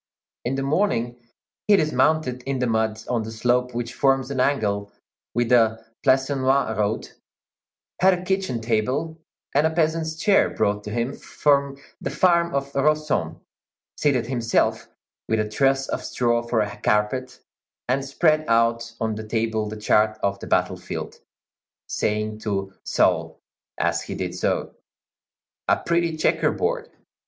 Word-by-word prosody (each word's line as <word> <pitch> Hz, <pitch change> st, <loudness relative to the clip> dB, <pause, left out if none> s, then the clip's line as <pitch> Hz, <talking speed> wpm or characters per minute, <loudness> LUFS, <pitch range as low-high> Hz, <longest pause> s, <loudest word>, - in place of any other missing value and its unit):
In 125 Hz, +2 st, -1 dB
the 135 Hz, -, -2 dB
morning 135 Hz, -, 0 dB, 0.5 s
he 210 Hz, -, +7 dB
dismounted 155 Hz, -5 st, +1 dB
in 135 Hz, -1 st, 0 dB
the 125 Hz, -, 0 dB
mud 110 Hz, -1 st, 0 dB
on 120 Hz, -2 st, 0 dB
the 110 Hz, -, -6 dB
slope 125 Hz, +2 st, 0 dB
which 120 Hz, 0 st, -3 dB
forms 135 Hz, -1 st, +1 dB
an 135 Hz, -, -2 dB
angle 105 Hz, -7 st, 0 dB, 0.4 s
with 120 Hz, -1 st, +1 dB
the 115 Hz, -2 st, +3 dB, 0.2 s
Plancenoit 135 Hz, -2 st, +2 dB
road, 105 Hz, +1 st, -1 dB, 0.9 s
had 190 Hz, 0 st, +5 dB
a 180 Hz, -, -7 dB
kitchen 190 Hz, -10 st, -1 dB
table 130 Hz, +9 st, -1 dB, 0.3 s
and 145 Hz, +3 st, +4 dB
a -, -, 0 dB
peasant's 160 Hz, 0 st, 0 dB
chair 195 Hz, +5 st, +3 dB
brought 105 Hz, 0 st, 0 dB
to -, -, -5 dB
him 120 Hz, +4 st, -2 dB
from 140 Hz, -1 st, 0 dB, 0.2 s
the -, -, -2 dB
farm 170 Hz, -3 st, +2 dB
of 140 Hz, 0 st, -2 dB
Rossomme, 140 Hz, -, 0 dB, 0.5 s
seated 130 Hz, -5 st, +1 dB
himself, 120 Hz, -2 st, 0 dB, 0.4 s
with 110 Hz, -, +2 dB
a 110 Hz, -, 0 dB
truss 135 Hz, +4 st, +1 dB
of -, -, -3 dB
straw 120 Hz, -1 st, +1 dB
for 120 Hz, -1 st, 0 dB
a 105 Hz, -1 st, -3 dB
carpet, 105 Hz, +5 st, 0 dB, 0.5 s
and 130 Hz, +2 st, +1 dB
spread 155 Hz, +3 st, +2 dB
out 115 Hz, 0 st, +2 dB
on 110 Hz, -1 st, -1 dB
the 110 Hz, 0 st, -6 dB
table 110 Hz, -1 st, -1 dB
the 110 Hz, -, -6 dB
chart 110 Hz, 0 st, +2 dB
of 100 Hz, 0 st, 0 dB
the -, -, -8 dB
battle -, -, +1 dB
field, -, -, -6 dB, 0.7 s
saying 105 Hz, 0 st, -2 dB
to 95 Hz, -3 st, -3 dB
Soult -, -, +1 dB, 0.4 s
as -, -, 0 dB
he -, -, -6 dB
did -, -, -3 dB
so, -, -, -1 dB, 0.9 s
"A -, -, +4 dB
pretty 170 Hz, -1 st, 0 dB
checker -, -, +2 dB
board." 485 Hz, -1 st, -2 dB
125 Hz, 150 wpm, -23 LUFS, 110-145 Hz, 0.9 s, he